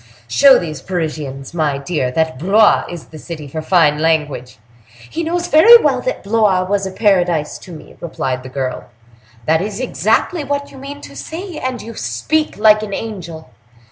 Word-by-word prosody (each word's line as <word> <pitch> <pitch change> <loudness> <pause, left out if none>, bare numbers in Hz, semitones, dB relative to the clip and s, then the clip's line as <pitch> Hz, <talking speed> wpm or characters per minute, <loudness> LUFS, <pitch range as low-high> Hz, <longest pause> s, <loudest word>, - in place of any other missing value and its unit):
Show 270 - +6
these 155 -5 -5
Parisians, 150 -6 -4
my 155 -4 0
dear, 140 -2 -2
that 160 0 -1
Blois 205 +6 +4
is 175 -3 -9
the 155 - -11
city 155 -2 -8
for 155 +3 -5
fine 155 -3 +3
language!" 150 -6 -1 0.5
"He 330 - -4
knows 345 +2 -1
very 380 +9 +8
well - - +1
that - - -3
Blois 200 -3 +2
was 195 +1 -1
a - - -6
Paradise 175 -7 +1
to 180 - -13
me," 160 - -12
replied 130 -6 -3
the 130 - -10
girl. 130 -1 -4 0.6
"That 160 +1 +2
is 205 +2 -4
exactly 250 - 0
what 285 0 -3
you 270 - -12
mean 285 +2 -8
to - - -11
say; 345 +1 -7
and 255 -2 -4
you 230 - -8
speak 210 - -2
like 215 0 +5
an 205 -2 -4
angel." 170 - -7
180 Hz, 175 wpm, -17 LUFS, 150-230 Hz, 0.6 s, very